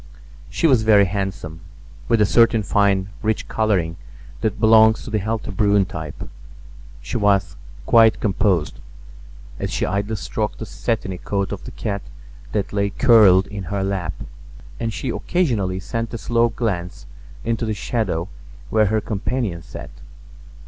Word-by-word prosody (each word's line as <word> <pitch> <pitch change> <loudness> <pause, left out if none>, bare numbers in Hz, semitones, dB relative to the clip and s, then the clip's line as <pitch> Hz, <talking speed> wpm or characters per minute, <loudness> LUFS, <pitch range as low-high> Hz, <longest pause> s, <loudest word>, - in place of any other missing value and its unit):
She - - -1
was 130 -8 +5
very 105 -2 +5
handsome, 90 -4 -4 0.5
with 115 -2 +3
a - - +6
certain 115 0 +4
fine, 100 -1 +2
rich 110 0 -1
coloring 95 -7 0 0.4
that 110 -1 -2
belongs 110 0 +5
to 125 - -8
the 110 - +1
healthy 110 +2 -3
brune 100 0 +3
type. 80 -5 -7 0.8
She 60 - -3
was 100 -3 +2 0.3
quite 115 - +5
composed, 95 -6 0 0.8
as - - -2
she - - -1
idly 100 +3 -2
stroked 105 +1 -3
the 110 - -6
satiny 105 -6 -3
coat 100 -1 -2
of 100 - -6
the - - -7
cat 100 -3 -4 0.5
that 105 -1 -2
lay 100 0 +1
curled 100 -5 +5
in 100 -1 -7
her 100 +3 -2
lap, 95 -2 -2 0.7
and 115 -1 -2
she 125 - -4
occasionally 115 - -1
sent 115 +3 -4
a - - -2
slow 115 +3 +1
glance 90 - -3 0.4
into 115 +1 -1
the 110 - -1
shadow 100 -6 -2 0.4
where 110 -1 +3
her 110 +2 +1
companion 105 -4 -3
sat. - - -10
105 Hz, 150 wpm, -21 LUFS, 95-110 Hz, 0.8 s, a